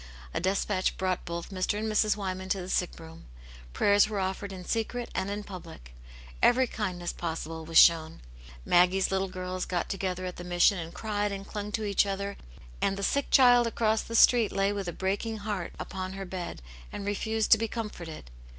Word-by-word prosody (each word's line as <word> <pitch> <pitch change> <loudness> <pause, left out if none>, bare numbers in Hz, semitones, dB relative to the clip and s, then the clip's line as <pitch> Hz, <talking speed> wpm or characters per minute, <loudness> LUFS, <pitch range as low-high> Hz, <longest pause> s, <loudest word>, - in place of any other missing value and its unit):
A - - 0
despatch 190 +1 0
brought 185 -1 -1
both 170 +2 -5
Mr. 190 +2 -1
and 220 +1 -2
Mrs. 215 0 +2
Wyman 190 -1 -4
to 195 - +1
the 180 0 -6
sick 180 -2 -1
room, 165 0 -12 0.5
prayers 205 - +4
were 210 - -3
offered 190 +1 -3
in 185 -2 -8
secret 235 +3 -2
and 190 +1 -2
in 205 +1 -4
public, 165 - -10 0.5
every 255 +2 +5
kindness 180 -7 -3
possible 160 -1 -5
was 165 0 0
shown, 160 -1 +6 0.5
Maggie's 180 +2 +4
little 195 0 0
girls 185 0 -4
got 175 -2 -2
together 185 -2 -2
at 180 - -5
the 175 - -7
Mission 175 +2 +3
and 165 0 -6
cried 210 0 -2
and 195 0 -5
clung 210 -1 -5
to 220 - -1
each 200 0 +2
other, 200 0 -3 0.5
and 195 - +1
the 200 - -4
sick 280 +6 0
child 245 -2 +6
across 220 -1 +1
the 230 - -6
street 230 -1 +6
lay 195 +1 +1
with 200 -2 -4
a - - -1
breaking 200 +5 -2
heart 205 -4 -4
upon 185 0 -5
her 195 0 -6
bed 180 - -6 0.3
and 200 - -6
refused 220 +2 -1
to 220 - +8
be 225 - 0
comforted. 175 - -7
195 Hz, 195 wpm, -28 LUFS, 180-210 Hz, 0.5 s, to